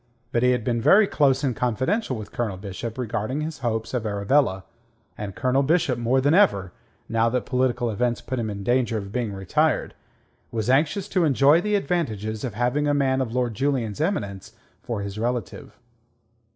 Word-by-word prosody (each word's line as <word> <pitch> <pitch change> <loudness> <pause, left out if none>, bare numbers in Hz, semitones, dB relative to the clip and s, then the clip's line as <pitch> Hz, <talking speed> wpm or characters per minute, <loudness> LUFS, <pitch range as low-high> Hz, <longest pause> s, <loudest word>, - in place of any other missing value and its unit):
But 120 - +1
he 125 - +4
had 125 -2 +1
been 115 0 0
very 195 - +6
close 145 -7 +2
and 130 -4 0
confidential 130 - -1
with 110 -1 -8
Colonel 110 -6 -3
Bishop 105 +4 -6
regarding 120 +3 -2
his 155 -1 -5
hopes 115 -2 -2
of 125 -3 -1
Arabella, 100 0 +1 0.5
and 100 -3 -6
Colonel 130 +2 +1
Bishop 145 -3 +1
more 120 +3 +2
than 145 +3 +2
ever, 100 - +3 0.4
now 115 +1 +2
that 125 +1 -1
political 125 -2 0
events 120 +2 0
put 130 -1 -4
him 110 -2 -2
in 100 -1 -5
danger 120 0 +1
of 100 -2 -6
being 115 -1 -2
retired, 95 -2 0 0.6
was 115 +1 -1
anxious 155 +8 +1
to 185 - +2
enjoy 145 +2 +4
the 210 +1 0
advantages 110 - -2
of 120 -6 -4
having 125 +6 0
a 145 - +2
man 135 -2 +1
of 120 -2 -3
Lord 125 -2 0
Julian's 130 -2 -1
eminence 100 - -2 0.3
for 115 -4 -4
his 100 +1 -6
relative. 120 -3 -4
125 Hz, 180 wpm, -24 LUFS, 110-140 Hz, 0.6 s, very